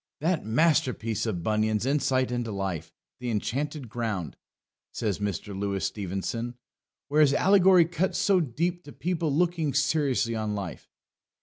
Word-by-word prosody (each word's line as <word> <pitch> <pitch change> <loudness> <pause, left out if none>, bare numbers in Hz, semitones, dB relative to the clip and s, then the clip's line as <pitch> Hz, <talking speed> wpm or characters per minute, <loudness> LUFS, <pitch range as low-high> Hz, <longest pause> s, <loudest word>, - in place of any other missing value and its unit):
"That 165 +2 0
masterpiece 125 -4 +1
of 90 -6 -2
Bunyan's 110 +1 +1
insight 135 -2 +1
into 120 -2 -2
life, 95 -5 -3 0.3
the 125 -1 -3
Enchanted 135 +5 -2
Ground," 110 -7 -3 0.6
says 105 -5 -2
Mr. 105 0 -3
Louis 100 0 -2
Stevenson, 105 +5 -3 0.5
"where 150 +2 +3
his 145 -2 +5
allegory 190 -2 +6
cuts 170 +3 -1
so 195 -2 +3
deep 170 +5 -1
to 145 - -11
people 170 -3 -1
looking 165 -2 +1
seriously 140 -5 +1
on 110 -1 -2
life." 95 -4 -6
125 Hz, 135 wpm, -27 LUFS, 105-155 Hz, 0.6 s, allegory